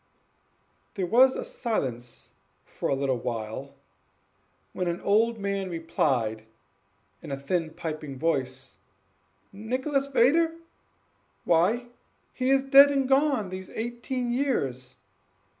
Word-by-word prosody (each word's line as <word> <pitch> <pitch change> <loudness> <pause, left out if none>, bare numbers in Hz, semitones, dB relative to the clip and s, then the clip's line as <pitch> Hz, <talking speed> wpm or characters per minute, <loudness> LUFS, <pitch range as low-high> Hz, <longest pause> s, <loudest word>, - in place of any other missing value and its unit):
There 190 - -1
was 255 +7 +5
a - - -3
silence 125 - -4 0.3
for - - -4
a 140 - +2
little 135 -2 -1
while, 115 +4 -5 1.0
when 180 - -2
an 170 0 -2
old 225 +3 +2
man 200 -2 -2
replied, 125 -10 -1 0.7
in - - -8
a 135 - -2
thin, 160 +3 -2
piping 155 -5 -5
voice: 130 -6 -2 0.7
"Nicholas 260 +7 -2
Vedder! 310 +6 +3 0.9
why, 200 +9 +2 0.4
he 255 0 -1
is 270 0 +4
dead 275 +1 +8
and 275 -2 0
gone 270 -7 +2
these 185 0 -7
eighteen 240 +2 -3
years! 135 - -2
190 Hz, 110 wpm, -27 LUFS, -, 1.0 s, dead